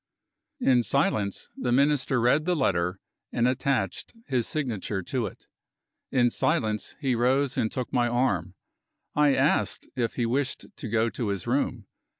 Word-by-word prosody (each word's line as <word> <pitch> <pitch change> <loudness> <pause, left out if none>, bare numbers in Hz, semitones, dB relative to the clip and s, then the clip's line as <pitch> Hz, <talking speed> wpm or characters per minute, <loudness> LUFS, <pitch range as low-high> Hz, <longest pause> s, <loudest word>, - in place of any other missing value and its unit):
In 125 -2 +4
silence, 100 -2 0
the 125 - -2
Minister 135 -1 +3
read 125 +6 +3
the 180 0 +2
letter, 90 - +1 0.3
and 120 +1 +2
attached 125 - -1
his 125 -5 0
signature 110 - -2
to 120 +2 -2
it. - - -12 0.7
In 120 -3 +3
silence, 110 -2 0
he 135 -4 +1
rose 130 +3 +2
and 115 -4 0
took 125 -2 -4
my 120 -2 +3
arm. 115 -8 0 0.6
I 150 -2 +4
asked - - +1
if 120 -2 -1
he 120 - 0
wished 130 +3 -1
to 140 -5 -6
go 115 +1 +1
to 115 - -3
his 100 -3 -2
room. - - -1
120 Hz, 155 wpm, -27 LUFS, 110-135 Hz, 0.7 s, In